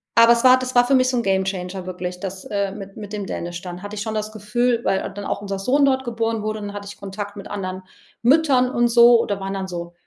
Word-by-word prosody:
aber 230 0 +7
es 235 - -1
war 255 0 +7
das 255 0 -5
war 245 0 +6
für 265 - +1
mich 255 0 +4
so 255 - -1
'n 235 - 0
Gamechanger 190 -1 -1
wirklich, 180 0 -5
das, 190 0 -6
äh, 200 -1 -2
mit 195 -1 -10
mit 205 -1 -8
dem 205 -2 -3
Dänisch 175 0 -5
dann 180 -2 -8
hatte 205 +1 -7
ich 205 - -4
schon 220 +1 -3
das 215 0 -3
Gefühl, 235 +3 0
weil 190 - 0
dann 205 - -7
auch - - -2
unser 200 -1 -4
Sohn 275 +8 +3
dort 265 -1 +2
geboren 230 -2 -2
wurde, 215 0 -2
dann 205 -1 -6
hatte 200 -1 -7
ich 205 - -10
Kontakt 200 +1 -7
mit 200 - -8
anderen 185 -2 -4 0.4
Müttern 265 -1 +4
und 240 -1 +2
so 235 0 +7
oder 200 -3 -2
waren 195 0 -4
dann 190 -1 -3
so 170 -1 -6
205 Hz, 260 wpm, -22 LUFS, 195-235 Hz, 0.4 s, aber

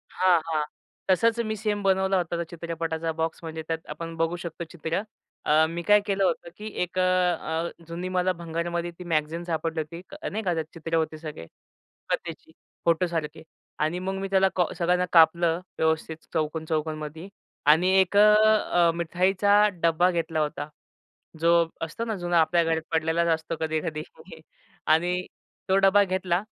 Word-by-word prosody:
हां, 185 -2 +4
हां. 155 -2 0 0.5
तसंच 230 +5 +3
मी 220 - -1
सेम 210 -1 -2
बनवला 190 0 +2
होता. 175 -1 -1
त्या 170 - -1
चित्रपटाचा 165 -1 -3
बॉक्स 160 0 -1
म्हणजे 160 0 -5
त्यात 160 0 -3
आपण 165 0 -6
बघू 165 +1 0
शकतो 170 0 -6
चित्रं. 170 +3 -3 0.4
अ, 155 +1 +5
मी 170 +1 -4
काय 210 0 +7
केलं 195 -1 0
होतं, 170 -2 0
की 215 - -7 0.2
एक 180 +1 -7
अ, - - +4
अ, 180 -2 +1 0.2
जुनी 170 +2 -5
मला 185 0 +1
भंगारामध्ये 170 0 -3
ती 180 - -6
मॅगझीन 160 +1 -1
सापडली 165 -1 -2
होती, 165 +3 -8 0.3
नाही 220 +2 -4
का, 180 -3 +1
त्यात - - -3
अनेक 155 - -28
चित्र 165 0 -3
होते 160 -1 0
सगळे 155 - -8 0.7
कथेची, 160 -1 -4 0.3
फोटोसारखी. 165 -2 0 0.4
आणि 155 +4 0
मग 190 +1 -3
मी 195 - -3
त्याला 190 0 +4
का 180 - +4
सगळ्यांना 180 +1 +1
कापलं 165 0 +5 0.2
व्यवस्थित 160 0 0 0.2
चौकोन-चौकोनमध्ये. 155 +1 -3 0.4
आणि 160 +5 +5
एक 190 +1 +1
अ, - - +8 0.5
अ, 170 -1 +5
मिठाईचा 190 +5 +3 0.2
डब्बा 170 +2 +4
घेतला 165 -2 -1
होता. 150 -1 -2 0.7
जो 170 0 +4
असतो 165 +8 -3
ना 225 -1 -2
जुना 175 -2 +2
आपल्या 170 +1 +3
घरात 165 0 0
पडलेलाच 165 +1 +1
असतो 160 +1 -5
कधी-कधी. 160 0 -2 0.8
आणि 175 +3 +2 0.4
तो 190 - +3
डबा 195 +1 +5
घेतला 185 -1 0
170 Hz, 160 wpm, -26 LUFS, 160-180 Hz, 0.8 s, अ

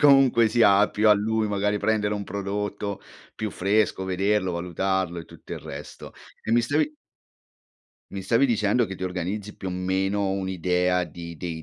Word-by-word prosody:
comunque 135 -5 +6
sia 105 -3 +5
più 110 +1 +2
a 105 - +9
lui 110 +1 +1
magari 105 0 0
prendere 105 -1 +1
un 100 - -4
prodotto 100 +1 -3 0.4
più 110 - -2
fresco, 100 +1 +1
vederlo, 95 +1 0
valutarlo 90 +1 -1
e - - -10
tutto - - -12
il - - -5
resto. - - -9 0.3
E - - -4
mi 120 +1 +5
stavi 145 +5 0 1.2
mi 100 - -5
stavi 115 +8 +3
dicendo 115 -1 +2
che 95 - -6
ti 95 - -5
organizzi 95 +3 -4
più 95 - -5
o - - -3
meno 95 +2 0
un'idea 90 -1 0
di 85 0 -9
dei 80 0 -5
100 Hz, 165 wpm, -25 LUFS, 95-105 Hz, 1.2 s, a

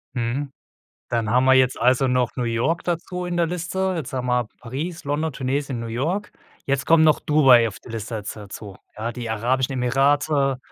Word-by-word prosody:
Mhm. 125 +4 -2 0.6
Dann 115 -2 -1
haben 125 +3 +3
wir 130 - +6
jetzt 130 -1 +3
also 130 +1 +3
noch 125 -1 0
New 125 - -2
York 120 +8 0
dazu 180 +1 -3
in 175 0 -3
der 170 - +3
Liste. 180 +2 -2
Jetzt 155 -7 -5
haben 125 -1 -3
wir 125 -2 +1
Paris, 155 +8 -5
London, 150 +2 -1
Tunesien, 135 0 -2
New 115 - -5
York. 160 - -2 0.3
Jetzt 135 0 0
kommen 165 -1 +5
noch 155 -1 +4
Dubai 135 -6 +5
auf 105 - -7
die - - -15
Liste 115 0 -5
da 105 0 -6
dazu. 100 0 -9 0.2
Ja, 115 +2 -3
die 125 - -8
Vereinigten 110 0 -4
Arabischen 130 +1 +1
Emirate, 135 +2 +2
130 Hz, 195 wpm, -23 LUFS, 120-155 Hz, 0.6 s, wir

